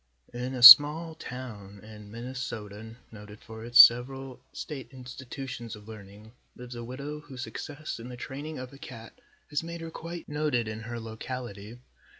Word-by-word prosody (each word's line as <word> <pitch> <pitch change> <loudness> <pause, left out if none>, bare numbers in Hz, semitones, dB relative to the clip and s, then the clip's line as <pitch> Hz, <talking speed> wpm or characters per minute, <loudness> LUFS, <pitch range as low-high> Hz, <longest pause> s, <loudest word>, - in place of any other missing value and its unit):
In 125 +2 -5
a 125 - -3
small 150 +6 +10
town 110 -9 -10
in 105 -1 -13
Minnesota, 115 -2 -8 0.2
noted 105 -1 -13
for 110 -1 -11
its 120 +1 +2
several 130 +2 +5
state 140 -4 -8
institutions 125 -2 -9
of 105 0 -16
learning, 105 0 -13 0.2
lives 125 0 -10
a 120 -1 -7
widow 140 +5 -7
whose 135 -4 -9
success 150 -1 -7
in 120 +2 -9
the 125 - -9
training 145 +5 -7
of 130 +1 -9
a 135 - -14
cat 115 -4 -11 0.4
has 145 - -1
made 170 0 -8
her 165 0 -8
quite 170 +1 -8
noted 150 -6 -1
in 110 0 -6
her 120 +1 -7
locality. 115 -1 -8
125 Hz, 160 wpm, -27 LUFS, 110-140 Hz, 0.4 s, small